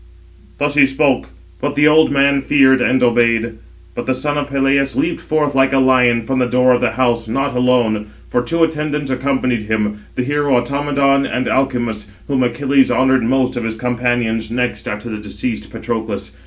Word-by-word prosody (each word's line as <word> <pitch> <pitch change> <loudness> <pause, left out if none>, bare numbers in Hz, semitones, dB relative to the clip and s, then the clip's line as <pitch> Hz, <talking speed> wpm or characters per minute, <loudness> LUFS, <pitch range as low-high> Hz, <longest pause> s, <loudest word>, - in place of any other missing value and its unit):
Thus 145 0 -1
he 140 -2 +5
spoke; 135 -1 0 0.3
but - - -2
the 150 +1 +4
old 155 +1 +5
man 140 0 +2
feared, 130 -2 +3
and 125 +1 +2
obeyed. 115 -1 +1 0.4
But 120 - -6
the 130 - +1
son 145 +2 -2
of 145 -1 -3
Peleus 135 0 +1
leaped 320 +5 -1
forth, 150 -2 -1
like 135 0 +2
a - - +3
lion, 125 -3 +3
from 130 +3 -2
the 125 - +1
door 125 +1 +3
of 120 - 0
the - - 0
house, 120 -2 0
not 135 +4 -2
alone; 120 -4 +1 0.2
for 120 - 0
two 165 +7 0
attendants 150 -3 -2
accompanied 130 -3 -1
him, 105 -1 -1 0.2
the 125 - -1
hero 145 0 0
Automedon, 140 +1 0
and 125 - -2
Alcimus, 120 -5 -1 0.2
whom 135 -2 0
Achilles 135 +2 +2
honoured 130 -1 +2
most 130 +2 0
of 120 - -3
his 115 0 -3
companions 120 -2 -1
next 125 +1 -3
after 105 +3 -5
the 110 -2 -5
deceased 110 +2 -5
Patroclus. 110 -3 -5
130 Hz, 180 wpm, -17 LUFS, 120-140 Hz, 0.4 s, he